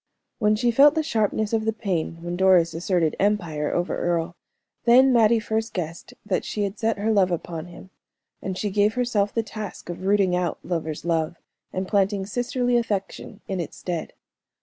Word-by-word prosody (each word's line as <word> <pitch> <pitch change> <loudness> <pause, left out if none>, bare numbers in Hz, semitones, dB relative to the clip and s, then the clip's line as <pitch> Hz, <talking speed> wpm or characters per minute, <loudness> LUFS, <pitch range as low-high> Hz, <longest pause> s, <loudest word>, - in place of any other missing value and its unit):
When 210 0 +3
she 240 +3 +1
felt 285 +6 +6
the 315 - +1
sharpness 220 -5 0
of 220 -1 +1
the 220 - +1
pain 175 -6 -3
when 175 0 -3
Doris 180 -3 +4
asserted 165 -1 0
empire 170 -8 0
over 175 +1 -1
Earle, 170 0 -1 0.5
then 255 +2 +6
Mattie 230 -1 +5
first 220 +1 -3
guessed 170 -2 -5
that - - 0
she 210 - -2
had 200 +1 -4
set 225 -1 0
her 215 +2 0
love 195 -3 +4
upon 170 -1 -4
him; 175 +2 -13 0.5
and 190 -1 -4
she 205 0 -2
gave 210 +2 +2
herself 230 -5 +1
the 230 - -1
task 215 -4 -8
of 185 +2 -6
rooting 195 -3 +3
out 180 -2 -1
lover's 160 -3 -3
love, 165 0 0 0.4
and 185 0 -3
planting 200 -1 +1
sisterly 245 +3 0
affection 205 -2 -3
in 190 -1 -3
its 170 - -5
stead. 175 -3 -4
195 Hz, 180 wpm, -24 LUFS, 175-220 Hz, 0.5 s, felt